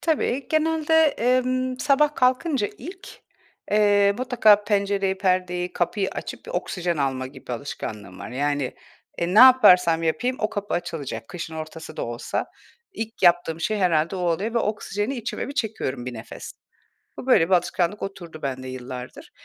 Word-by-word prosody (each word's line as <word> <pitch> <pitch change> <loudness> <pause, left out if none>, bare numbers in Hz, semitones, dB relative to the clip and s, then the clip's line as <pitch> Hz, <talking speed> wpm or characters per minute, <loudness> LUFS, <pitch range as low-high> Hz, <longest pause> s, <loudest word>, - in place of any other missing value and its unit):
Tabii, 280 -5 0
genelde, 320 0 +1 0.2
emm, 255 +1 +1
sabah 295 +1 +3
kalkınca 255 -2 +1
ilk, 370 +8 -10 0.5
eee, 205 -1 +4
mutlaka 220 -5 +4
pencereyi, 200 -2 0
perdeyi, 180 -2 0
kapıyı 190 +3 -1
açıp - - -7
bir - - -7
oksijen 175 -2 -2
alma 135 -2 -1
gibi 130 -2 -9
alışkanlığım 105 -7 -6
var. - - -8
Yani, 145 0 -1 0.4
eee, 175 +2 -1
ne - - +6
yaparsam 180 -10 +7
yapayım 245 +11 0
o 215 - 0
kapı 205 0 -3
açılacak, 140 -10 -4
kışın 165 -2 -7
ortası 160 +1 -8
da - - -2
olsa. 120 0 -3 0.5
İlk 225 - -6
yaptığım 170 -2 +3
şey 215 +5 -1
herhâlde 170 -1 +1
o - - -4
oluyor 180 +7 -1
ve - - +3
oksijeni 210 +3 -2
içime 235 +3 -4
bir 280 - -7
çekiyorum, 205 - -3
bir 125 - -5
nefes. 110 +1 -9 0.7
Bu - - -7
böyle 180 -10 +4
bir 190 - +4
alışkanlık 180 +3 0
oturdu 170 -5 -7
bende 130 -2 -4
yıllardır. 125 0 -8
190 Hz, 155 wpm, -24 LUFS, 160-240 Hz, 0.7 s, yaparsam